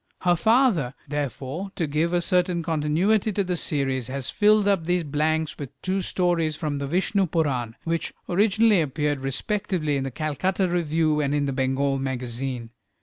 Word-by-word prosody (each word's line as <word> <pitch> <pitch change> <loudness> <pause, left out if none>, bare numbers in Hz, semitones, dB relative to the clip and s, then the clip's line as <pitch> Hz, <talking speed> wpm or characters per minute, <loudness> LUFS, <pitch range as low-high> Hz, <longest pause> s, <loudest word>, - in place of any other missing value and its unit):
Her 175 -1 +3
father, 215 - +2
therefore, 145 +5 -4
to 170 - 0
give 155 +3 0
a 175 0 +2
certain 180 -1 +1
continuity 165 +7 +1
to 200 - +1
the 180 -1 -1
series, 135 -6 -1
has 135 0 -4
filled 210 0 +4
up 195 -5 +2
these 180 0 +1
blanks 155 +1 0
with 140 -4 -8
two 190 +1 0
stories 175 -4 0
from 150 -2 -3
the 140 - -3
"Vishnupurana," 160 - 0
which 165 0 -2 0.2
originally 210 +1 +4
appeared 150 -1 -1
respectively 155 - -1
in 135 - -2
the 135 - -3
"Calcutta 160 +7 -1
Review" 160 -3 +1
and 145 -1 0
in 145 -1 +1
the 135 - -1
"Bengal 135 +1 0
Magazine." 125 -2 -4
155 Hz, 160 wpm, -25 LUFS, 140-180 Hz, 0.2 s, filled